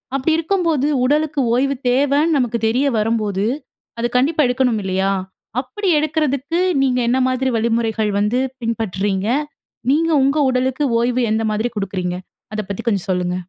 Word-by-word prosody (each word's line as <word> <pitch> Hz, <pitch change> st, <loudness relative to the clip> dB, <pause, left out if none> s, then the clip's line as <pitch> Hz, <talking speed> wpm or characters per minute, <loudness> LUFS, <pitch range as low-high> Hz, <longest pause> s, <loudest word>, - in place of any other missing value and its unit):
அப்படி 275 Hz, +4 st, +1 dB
இருக்கும்போது 330 Hz, -4 st, +1 dB, 0.2 s
உடலுக்கு 300 Hz, +2 st, +1 dB
ஓய்வு 275 Hz, +3 st, +1 dB
தேவன்னு 285 Hz, +5 st, +2 dB
நமக்கு 245 Hz, -3 st, 0 dB
தெரிய 255 Hz, +6 st, +1 dB
வரம்போது, 210 Hz, -2 st, 0 dB, 0.5 s
அது 235 Hz, -, +1 dB
கண்டிப்பா 295 Hz, +5 st, +2 dB
எடுக்கணும் 250 Hz, -3 st, +1 dB
இல்லையா? 190 Hz, +1 st, 0 dB, 0.5 s
அப்படி 395 Hz, +10 st, -5 dB
எடுக்கிறதுக்கு, 305 Hz, 0 st, -1 dB, 0.2 s
நீங்க 250 Hz, -2 st, +1 dB
என்ன 250 Hz, -, +2 dB
மாதிரி 255 Hz, +1 st, 0 dB
வழிமுறைகள் 225 Hz, -1 st, 0 dB
வந்து 210 Hz, +5 st, +1 dB, 0.2 s
பின்பற்றுறீங்க? 205 Hz, -3 st, -1 dB, 0.6 s
நீங்க 330 Hz, +3 st, +2 dB
உங்க 275 Hz, +3 st, +2 dB
உடலுக்கு 260 Hz, +3 st, 0 dB, 0.2 s
ஓய்வு 245 Hz, +1 st, +1 dB
எந்த 220 Hz, +1 st, +1 dB
மாதிரி 220 Hz, +3 st, -1 dB
குடுக்குறீங்க? 185 Hz, -3 st, -2 dB, 0.4 s
அத 215 Hz, -, -1 dB
பத்தி 200 Hz, -, -4 dB
கொஞ்சம் 200 Hz, -5 st, 0 dB
சொல்லுங்க. 180 Hz, -1 st, -1 dB
250 Hz, 140 wpm, -19 LUFS, 215-280 Hz, 0.6 s, தேவன்னு